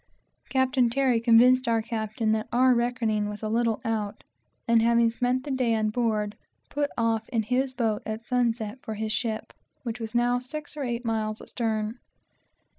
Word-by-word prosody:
Captain 260 -2 +2
Terry 255 -1 +2
convinced 245 +2 +5
our 225 -1 +2
captain 220 -1 -2
that 220 0 0
our 255 +1 +5
reckoning 235 -3 0
was 210 +1 -7
a 215 - -1
little 230 0 +1
out, 215 -2 -2 0.4
and, 230 -1 +5
having 235 0 +4
spent 250 +2 0
the 285 - -5
day 250 -3 +1
on 215 -1 0
board, 215 -3 0 0.4
put 290 0 0
off 225 -1 0
in 225 -2 0
his 255 +4 0
boat 225 -4 -1
at 220 +1 -5
sunset 240 -2 0
for 220 - -5
his 215 +1 -3
ship, 220 0 -2 0.3
which 235 -1 -4
was 225 0 -6
now 245 +1 +3
six 295 +5 -7
or 300 - -5
eight 240 -1 -3
miles 220 -1 -1
astern. 220 0 -3
230 Hz, 175 wpm, -27 LUFS, 220-250 Hz, 0.4 s, convinced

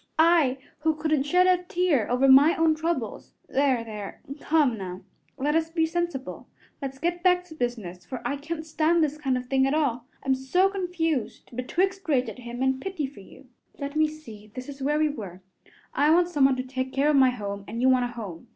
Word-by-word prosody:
I, 320 -5 +4 0.2
who 315 0 +1
couldn't 305 -2 0
shed 360 +4 +4
a 365 -1 +3
tear 350 - 0
over 250 +3 +3
my 280 +5 +7
own 325 -1 +3
troubles 315 -8 -3
there, 265 -3 +1
there, 210 -3 -8 0.2
come 295 -7 +2
now, 185 -2 -7 0.4
let 290 +3 0
us 325 0 +1
be 325 -1 +1
sensible. 340 -5 -4 0.3
Let's 270 -1 -5
get 345 +4 -2
back 360 0 +3
to 360 -3 -13
business, 225 - -4
for 255 - -6
I 285 - -2
can't 315 +2 -5
stand 320 +1 +2
this 300 0 -2
kind 265 -4 0
of 250 - -5
thing 265 +1 +2
at 275 - +1
all. 250 -6 0 0.2
I'm 270 - +2
so 265 +9 +2
confused 330 - -3
betwixt 375 +10 -1
rage 255 -5 +2
at 220 - -10
him 240 +1 -5
and 265 0 +1
pity 375 -6 -3
for 270 -5 -10
you 200 - -15 0.3
Let 280 0 -5
me 310 0 +4
see; 225 -9 -12
this 255 0 -6
is 280 -1 -9
where 295 +3 +1
we 310 0 +3
were: 190 -10 -8 0.5
I 290 +2 +3
want 345 +2 +4
someone 275 -5 +3
to 255 - -3
take 260 0 -4
care 285 +2 +3
of - - +2
my 265 -2 +6
home, 200 -5 -5
and 230 +2 -5
you 255 - +3
want 255 -1 +4
a - - -1
home. 205 -4 -8
280 Hz, 215 wpm, -26 LUFS, 250-320 Hz, 0.5 s, my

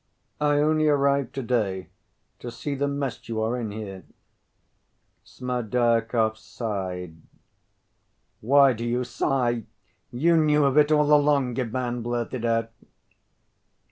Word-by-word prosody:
"I 150 0 +2
only 155 +1 +2
arrived 140 -2 +1
to‐day.... 110 -8 -1 0.5
To 120 - -7
see 125 +5 -5
the 140 +1 -1
mess 140 -5 -4
you 110 -1 -2
are 115 +3 0
in 120 -3 -3
here." 100 -3 -7 1.2
Smerdyakov 115 -2 0
sighed. 90 -7 -5 1.2
"Why 135 +3 +5
do 115 0 -6
you 120 +1 -1
sigh? 120 -2 -1 0.4
You 165 +7 +2
knew 150 -2 +3
of 135 -1 +1
it 150 0 +4
all 150 -1 +4
along," 145 -4 +2
Ivan 125 0 -2
blurted 120 +1 -3
out. 115 -1 0
125 Hz, 115 wpm, -25 LUFS, 115-140 Hz, 1.2 s, Why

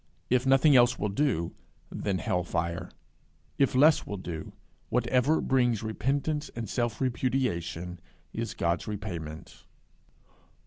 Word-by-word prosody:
If 125 +1 +3
nothing 135 +2 +6
else 120 0 +5
will 105 - -1
do, 100 - 0 0.4
then 100 -2 -1
hell 90 0 0
fire; 85 +1 -2 0.7
if 135 -2 +3
less 150 +4 +6
will 100 - -4
do, 85 -4 -6 0.4
whatever 125 +5 +2
brings 120 -5 +2
repentance 145 +7 -1
and 115 -1 -4
self 120 0 -1
repudiation, 105 -10 -1 0.3
is 115 -2 -4
God's 85 0 0
repayment. 85 -7 -6
115 Hz, 120 wpm, -28 LUFS, 90-130 Hz, 0.7 s, nothing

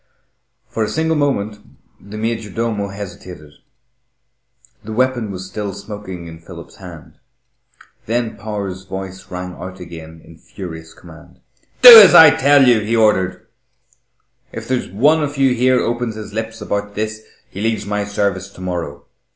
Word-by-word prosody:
For 115 - -3
a 105 - -2
single 160 0 -1
moment 110 -8 -1 0.4
the 105 +1 -11
major 110 -1 -3
domo 110 -1 -3
hesitated. 90 -5 -10 1.3
The 110 - -7
weapon 125 -2 0
was 95 -1 -7
still 100 0 -6
smoking 100 -4 -9
in 80 -1 -11
Philip's 85 0 -13
hand. 85 -5 -13 0.9
Then 115 0 -2
Power's 100 -3 -6
voice 95 0 -8
rang 90 0 -6
out 95 +1 -9
again 80 -2 -11
in 80 - -17
furious 80 -4 -10
command. - - -16 0.4
"Do 240 -2 +13
as 195 - +7
I 160 -1 +10
tell 140 -1 +4
you," 120 -3 +5
he 110 +2 -2
ordered. 105 -5 +1 1.1
"If - - -8
there's 130 -1 -2
one 145 - +2
of 145 -1 -4
you 135 -2 +3
here 125 +1 +2
opens 120 -1 -2
his 105 -1 -9
lips 110 0 -5
about 105 0 -4
this, 110 0 -4 0.3
he 100 - -7
leaves 110 -1 -1
my 105 0 -2
service 100 -2 -2
to - - -16
morrow. 90 -2 -5
105 Hz, 150 wpm, -18 LUFS, 95-115 Hz, 1.3 s, Do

